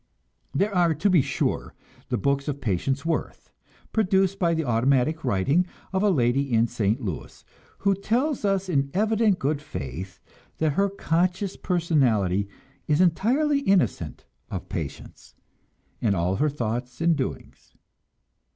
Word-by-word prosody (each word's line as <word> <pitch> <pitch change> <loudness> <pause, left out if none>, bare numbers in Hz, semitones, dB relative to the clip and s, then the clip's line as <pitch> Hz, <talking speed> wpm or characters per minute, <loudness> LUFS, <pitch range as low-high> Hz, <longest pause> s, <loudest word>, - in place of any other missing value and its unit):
There 200 +8 0
are, 175 -3 +3
to 180 +7 +1
be 175 -5 +6
sure, - - -2 0.3
the - - 0
books 140 +6 0
of 140 -1 -2
Patience 130 - -1
Worth, 165 - -3 0.4
produced 195 -2 +2
by 170 -2 +2
the 160 -1 -1
automatic 130 +6 +2
writing 140 - +2 0.3
of 190 - +1
a 210 - +4
lady 135 -3 +1
in 115 0 +4
St. 115 -1 0
Louis, 95 - -6 0.3
who 200 0 +2
tells 240 +9 0
us 195 -1 +1
in 140 -6 +1
evident 215 -1 +2
good 150 -4 -1
faith 90 - -7 0.4
that 155 -2 +1
her 200 +5 +2
conscious 185 +1 0
personality 120 - +1 0.4
is 150 0 +2
entirely 245 - +3
innocent 185 - 0 0.2
of - - -6
Patience, - - -7 0.7
and 105 -4 +2
all 90 +2 0
her 150 - +2
thought 125 -2 -4
and 165 0 +3
doings. 130 -3 -6
155 Hz, 140 wpm, -25 LUFS, 120-190 Hz, 0.7 s, be